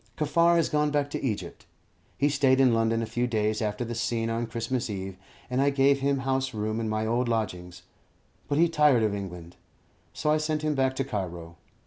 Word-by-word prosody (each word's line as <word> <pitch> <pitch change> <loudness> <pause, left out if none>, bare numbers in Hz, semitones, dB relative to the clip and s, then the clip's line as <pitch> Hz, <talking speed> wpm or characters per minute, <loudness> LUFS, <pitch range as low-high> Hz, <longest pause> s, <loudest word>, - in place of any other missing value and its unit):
Kaffar 170 +3 +3
has 165 -2 +3
gone 150 0 +1
back 145 -1 -1
to - - -4
Egypt. 110 -6 -4 0.5
He 145 - +2
stayed 135 -2 +3
in 130 -3 +5
London 115 0 +1
a - - -1
few 120 +3 -1
days 110 -2 0
after 105 +2 -2
the 120 - -4
scene 115 -1 -1
on 115 +1 -2
Christmas 115 +2 -3
Eve, 95 -2 -5 0.3
and 125 +1 0
I 140 - +4
gave 140 0 +3
him 135 0 0
house 130 -2 -1
room 110 +1 -2
in 110 -1 -2
my 110 0 -1
old 120 +2 0
lodgings; 90 -6 -3 0.6
but 145 - 0
he 170 +2 +5
tired 150 -7 +4
of 105 -2 +1
England, 90 -4 -7 0.5
so 150 - -1
I 155 - +4
sent 155 0 -2
him 155 -1 +1
back 130 -1 +1
to 135 - 0
Cairo. 90 -9 -5
120 Hz, 205 wpm, -27 LUFS, 110-140 Hz, 0.6 s, in